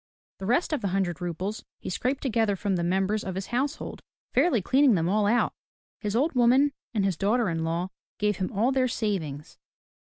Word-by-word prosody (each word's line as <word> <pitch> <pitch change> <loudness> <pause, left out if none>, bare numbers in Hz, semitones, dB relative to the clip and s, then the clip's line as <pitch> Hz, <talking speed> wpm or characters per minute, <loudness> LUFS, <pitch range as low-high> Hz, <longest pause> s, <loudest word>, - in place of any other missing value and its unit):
The 190 - -5
rest 250 +8 +2
of 290 - 0
the 200 - 0
hundred 180 -3 -1
roubles 185 +5 -3
he - - -6
scraped 255 +8 -1
together 225 -5 +1
from 195 0 -1
the 170 - -1
members 195 +4 +1
of 190 - -4
his 190 +1 -3
household, 275 +5 -2 0.3
fairly 320 -10 +4
cleaning 260 +4 +4
them 165 -1 +1
all 205 +2 +2
out. 235 +3 +2 0.5
His 210 0 -2
old 290 +7 +2
woman 255 +3 +4 0.2
and 210 -4 +1
his 190 -3 +1
daughter 215 +5 +1
in 165 -1 -1
law 170 +3 -1 0.3
gave 210 -2 +1
him 185 - -2
all 230 +5 +2
their 260 -1 +2
savings. 170 - -3
205 Hz, 195 wpm, -27 LUFS, 185-245 Hz, 0.5 s, fairly